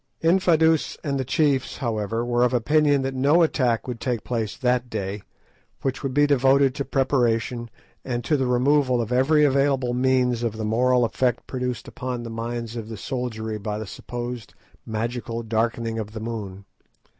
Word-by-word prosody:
Infadoos 165 Hz, -3 st, +3 dB
and 140 Hz, -3 st, -1 dB
the -, -, 0 dB
chiefs, 135 Hz, 0 st, +1 dB
however, 115 Hz, -1 st, -2 dB
were 120 Hz, 0 st, +1 dB
of 125 Hz, 0 st, +2 dB
opinion 145 Hz, +3 st, +3 dB
that 135 Hz, 0 st, -2 dB
no 145 Hz, +6 st, +4 dB
attack 125 Hz, -8 st, +1 dB
would 120 Hz, -2 st, -4 dB
take 120 Hz, -3 st, -2 dB
place 115 Hz, -4 st, -3 dB
that 125 Hz, -1 st, 0 dB
day, 100 Hz, -1 st, -4 dB, 0.6 s
which 135 Hz, -1 st, -2 dB
would 135 Hz, -, -2 dB
be 145 Hz, +2 st, +4 dB
devoted 135 Hz, -1 st, +4 dB
to 140 Hz, -, -3 dB
preparation 120 Hz, -3 st, 0 dB, 0.3 s
and 120 Hz, -2 st, -3 dB
to 150 Hz, -, +1 dB
the 135 Hz, -3 st, 0 dB
removal 130 Hz, +1 st, +3 dB
of 115 Hz, 0 st, -2 dB
every 150 Hz, +4 st, +4 dB
available 135 Hz, -3 st, +2 dB
means 125 Hz, -1 st, +2 dB
of 115 Hz, -2 st, -2 dB
the 110 Hz, -, -3 dB
moral 125 Hz, +3 st, +3 dB
effect 125 Hz, +1 st, 0 dB
produced 125 Hz, -2 st, -4 dB
upon 125 Hz, -2 st, -5 dB
the 115 Hz, -, -6 dB
minds 115 Hz, 0 st, -4 dB
of 115 Hz, -2 st, -6 dB
the 110 Hz, -, -6 dB
soldiery 110 Hz, -3 st, -4 dB
by 105 Hz, 0 st, -3 dB
the 110 Hz, -, -5 dB
supposed 120 Hz, +2 st, -6 dB, 0.3 s
magical 115 Hz, +1 st, -3 dB
darkening 115 Hz, 0 st, -1 dB
of 105 Hz, -1 st, -6 dB
the 110 Hz, -, -5 dB
moon. 105 Hz, -4 st, -6 dB
125 Hz, 170 wpm, -24 LUFS, 115-135 Hz, 0.6 s, no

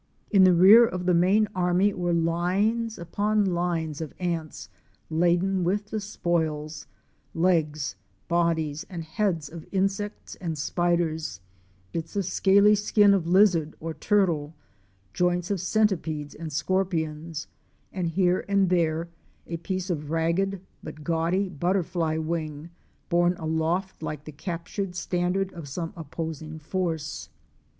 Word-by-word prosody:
In 195 Hz, -3 st, +7 dB
the 185 Hz, -, +6 dB
rear 200 Hz, +7 st, +9 dB
of 185 Hz, -6 st, -1 dB
the 180 Hz, -, +3 dB
main 190 Hz, +5 st, +4 dB
army 180 Hz, +2 st, +2 dB
were 175 Hz, -2 st, -1 dB
lines 185 Hz, +7 st, +1 dB
upon 205 Hz, +4 st, 0 dB
lines 170 Hz, -4 st, -1 dB
of 155 Hz, -, -6 dB
ants 165 Hz, -, -3 dB, 0.4 s
laden 175 Hz, +3 st, +2 dB
with 205 Hz, +4 st, -1 dB
the 220 Hz, -, -1 dB
spoils: 160 Hz, -6 st, -2 dB, 0.5 s
legs, 155 Hz, -, +1 dB, 0.3 s
bodies, 165 Hz, -3 st, 0 dB
and 175 Hz, -4 st, -5 dB
heads 165 Hz, -1 st, -1 dB
of 160 Hz, +2 st, -10 dB
insects 195 Hz, +2 st, -2 dB
and 165 Hz, -4 st, -4 dB
spiders, 160 Hz, -, 0 dB, 0.5 s
bits 165 Hz, +2 st, -5 dB
of 200 Hz, -2 st, 0 dB
scaly 200 Hz, +3 st, +5 dB
skin 205 Hz, 0 st, +4 dB
of 180 Hz, -4 st, 0 dB
lizard 175 Hz, -4 st, +4 dB
or 165 Hz, 0 st, -4 dB
turtle, 160 Hz, -3 st, +1 dB, 0.6 s
joints 180 Hz, +1 st, 0 dB
of 195 Hz, -4 st, -1 dB
centipedes 175 Hz, -8 st, 0 dB
and 160 Hz, 0 st, -7 dB
scorpions, 160 Hz, -1 st, -1 dB, 0.5 s
and 180 Hz, -3 st, -1 dB
here 180 Hz, +2 st, +2 dB
and 195 Hz, -2 st, +3 dB
there 165 Hz, -1 st, +1 dB, 0.4 s
a 170 Hz, -, -4 dB
piece 185 Hz, +2 st, -3 dB
of 150 Hz, -3 st, -3 dB
ragged 170 Hz, +4 st, 0 dB, 0.2 s
but 155 Hz, -1 st, -9 dB
gaudy 170 Hz, +5 st, +1 dB
butterfly 175 Hz, -1 st, 0 dB
wing 160 Hz, -1 st, -4 dB, 0.4 s
borne 175 Hz, +1 st, +3 dB
aloft 160 Hz, +4 st, -1 dB
like 150 Hz, -2 st, -5 dB
the 155 Hz, -, -7 dB
captured 175 Hz, +4 st, -5 dB
standard 180 Hz, +2 st, -1 dB
of 165 Hz, -4 st, -8 dB
some 165 Hz, +6 st, -4 dB
opposing 160 Hz, -1 st, -6 dB
force. 155 Hz, -, -3 dB
175 Hz, 130 wpm, -26 LUFS, 160-190 Hz, 0.6 s, rear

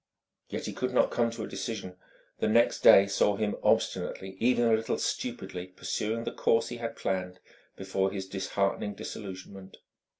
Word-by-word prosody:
Yet -, -, -4 dB
he -, -, -4 dB
could -, -, -2 dB
not -, -, +4 dB
come 120 Hz, -1 st, +2 dB
to 115 Hz, -, -6 dB
a -, -, -4 dB
decision; 100 Hz, -5 st, -5 dB, 0.4 s
the -, -, +1 dB
next 115 Hz, +2 st, +3 dB
day 100 Hz, -, +8 dB
saw 100 Hz, +1 st, +2 dB
him 105 Hz, 0 st, -1 dB
obstinately, 95 Hz, 0 st, 0 dB
even 120 Hz, 0 st, +3 dB
a 115 Hz, -, +4 dB
little 110 Hz, 0 st, +1 dB
stupidly, 90 Hz, 0 st, -3 dB
pursuing 105 Hz, +5 st, -3 dB
the -, -, -3 dB
course 115 Hz, 0 st, +2 dB
he 120 Hz, -, -5 dB
had 115 Hz, -1 st, -4 dB
planned 90 Hz, -1 st, -3 dB, 0.4 s
before 95 Hz, 0 st, -1 dB
his 95 Hz, -1 st, -5 dB
disheartening 100 Hz, +1 st, -1 dB
disillusionment. 95 Hz, -1 st, -8 dB
100 Hz, 165 wpm, -29 LUFS, 95-115 Hz, 0.4 s, day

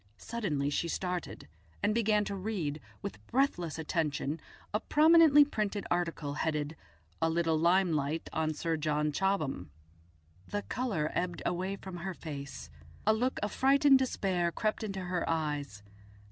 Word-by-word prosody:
Suddenly 155 Hz, -12 st, -2 dB
she 170 Hz, -, 0 dB
started, 180 Hz, -, -3 dB, 0.4 s
and 210 Hz, -, +3 dB
began 215 Hz, -2 st, +2 dB
to 200 Hz, -, -3 dB
read 185 Hz, -7 st, -3 dB, 0.2 s
with 200 Hz, -, -6 dB
breathless 205 Hz, -, 0 dB
attention 155 Hz, -2 st, -1 dB, 0.3 s
a 210 Hz, -, +2 dB
prominently 310 Hz, +1 st, +6 dB
printed 210 Hz, -6 st, -2 dB
article, 170 Hz, -4 st, -1 dB
headed 150 Hz, 0 st, -1 dB, 0.5 s
"A 165 Hz, -, +3 dB
Little 165 Hz, 0 st, +1 dB
Limelight 165 Hz, -3 st, +2 dB
on 155 Hz, -1 st, 0 dB
Sir 165 Hz, +1 st, -1 dB
John 150 Hz, 0 st, 0 dB
Chobham." 155 Hz, -, -1 dB, 0.8 s
The 205 Hz, 0 st, -3 dB
colour 215 Hz, -12 st, -1 dB
ebbed 175 Hz, -1 st, -2 dB
away 185 Hz, +2 st, -1 dB
from 190 Hz, -2 st, -8 dB
her 185 Hz, +1 st, -4 dB
face, 140 Hz, -, -7 dB, 0.3 s
a 215 Hz, -, +5 dB
look 250 Hz, +4 st, 0 dB
of 210 Hz, -, -1 dB
frightened 275 Hz, 0 st, +5 dB
despair 185 Hz, -9 st, 0 dB
crept 215 Hz, +4 st, -1 dB
into 195 Hz, -3 st, -3 dB
her 180 Hz, -1 st, -1 dB
eyes. 145 Hz, -9 st, -2 dB
175 Hz, 140 wpm, -31 LUFS, 155-210 Hz, 0.8 s, prominently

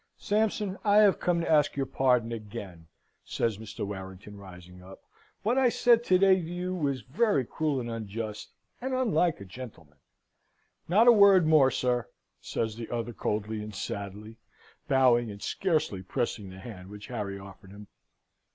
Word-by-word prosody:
"Sampson, 210 Hz, -2 st, -1 dB
I 205 Hz, -1 st, +3 dB
have 210 Hz, -2 st, +5 dB
come 175 Hz, -1 st, +1 dB
to -, -, -3 dB
ask 150 Hz, -2 st, +3 dB
your 135 Hz, -1 st, -1 dB
pardon 125 Hz, -3 st, +1 dB
again," 100 Hz, -7 st, -8 dB, 0.4 s
says 110 Hz, -3 st, -2 dB
Mr. 110 Hz, -2 st, -6 dB
Warrington, 95 Hz, +1 st, -8 dB
rising 90 Hz, -2 st, -13 dB
up. 95 Hz, +1 st, -14 dB, 0.4 s
"What 240 Hz, +5 st, +2 dB
I 260 Hz, -2 st, +4 dB
said 235 Hz, 0 st, +3 dB
to 185 Hz, -, +4 dB
day 195 Hz, 0 st, +5 dB
to 185 Hz, -, +1 dB
you 175 Hz, +2 st, -4 dB
was 140 Hz, -7 st, -1 dB
very 150 Hz, -, +1 dB
cruel 150 Hz, +1 st, -1 dB
and 120 Hz, -, -5 dB
unjust, 110 Hz, -1 st, -5 dB, 0.3 s
and 260 Hz, +1 st, -2 dB
unlike 205 Hz, -10 st, +1 dB
a 100 Hz, -, -9 dB
gentleman." 90 Hz, -, -11 dB, 0.9 s
"Not 215 Hz, +7 st, +5 dB
a -, -, +11 dB
word 200 Hz, -5 st, +6 dB
more, 155 Hz, -4 st, +5 dB
sir," 125 Hz, -1 st, -1 dB, 0.3 s
says 110 Hz, -2 st, -3 dB
the 115 Hz, -, -7 dB
other, 120 Hz, 0 st, -3 dB
coldly 105 Hz, 0 st, -3 dB
and 105 Hz, -1 st, -8 dB
sadly, 100 Hz, +3 st, -6 dB, 0.5 s
bowing 125 Hz, -3 st, +3 dB
and 100 Hz, -1 st, -8 dB
scarcely 155 Hz, -, -1 dB
pressing 100 Hz, +1 st, -3 dB
the 95 Hz, -, -11 dB
hand 95 Hz, -2 st, -10 dB
which 105 Hz, 0 st, -10 dB
Harry 105 Hz, -5 st, -5 dB
offered 95 Hz, -1 st, -13 dB
him. 100 Hz, +1 st, -12 dB
120 Hz, 165 wpm, -28 LUFS, -, 0.9 s, a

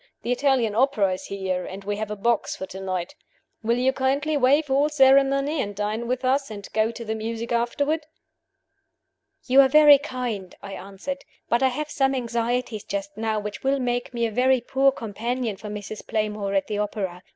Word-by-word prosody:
The 240 Hz, -, -2 dB
Italian 250 Hz, -4 st, +2 dB
opera 215 Hz, -5 st, +2 dB
is 185 Hz, -, -6 dB
here, 190 Hz, -2 st, -3 dB
and 195 Hz, +1 st, -8 dB
we 205 Hz, +1 st, -2 dB
have 215 Hz, 0 st, -3 dB
a 210 Hz, -, -3 dB
box 230 Hz, +2 st, 0 dB
for 190 Hz, -, -5 dB
to 190 Hz, 0 st, -9 dB
night. 185 Hz, +3 st, -3 dB, 0.5 s
Will 235 Hz, +1 st, +1 dB
you 260 Hz, +2 st, +2 dB
kindly 275 Hz, +3 st, 0 dB
waive 285 Hz, +2 st, +3 dB
all 280 Hz, +3 st, +3 dB
ceremony 275 Hz, +1 st, +4 dB
and 205 Hz, -1 st, -4 dB
dine 210 Hz, +3 st, -2 dB
with 255 Hz, +1 st, -2 dB
us 270 Hz, +1 st, +1 dB
and 205 Hz, -2 st, -8 dB
go 220 Hz, 0 st, +2 dB
to 230 Hz, 0 st, -7 dB
the 220 Hz, -, -2 dB
music 225 Hz, +1 st, -4 dB
afterward?" 285 Hz, +6 st, 0 dB, 1.4 s
"You 265 Hz, +2 st, +7 dB
are 270 Hz, -, +5 dB
very 295 Hz, 0 st, +8 dB
kind," 245 Hz, -9 st, -5 dB
I 200 Hz, -1 st, -7 dB
answered. 200 Hz, +10 st, -6 dB, 0.3 s
"But 235 Hz, -, +2 dB
I 265 Hz, -, +5 dB
have 295 Hz, +4 st, -3 dB
some 270 Hz, -1 st, +1 dB
anxieties 235 Hz, -2 st, -2 dB
just 200 Hz, 0 st, -5 dB
now 220 Hz, 0 st, -1 dB
which 210 Hz, 0 st, -6 dB
will 270 Hz, +1 st, +2 dB
make 245 Hz, -1 st, -1 dB
me 235 Hz, -1 st, -1 dB
a 225 Hz, -, -2 dB
very 255 Hz, +3 st, +3 dB
poor 270 Hz, +3 st, +2 dB
companion 235 Hz, 0 st, -3 dB
for 210 Hz, +2 st, -9 dB
Mrs. 210 Hz, 0 st, -7 dB
Playmore 210 Hz, -2 st, -1 dB
at 195 Hz, -1 st, +2 dB
the 210 Hz, -1 st, -3 dB
opera. 200 Hz, -4 st, -3 dB
235 Hz, 195 wpm, -24 LUFS, 210-265 Hz, 1.4 s, very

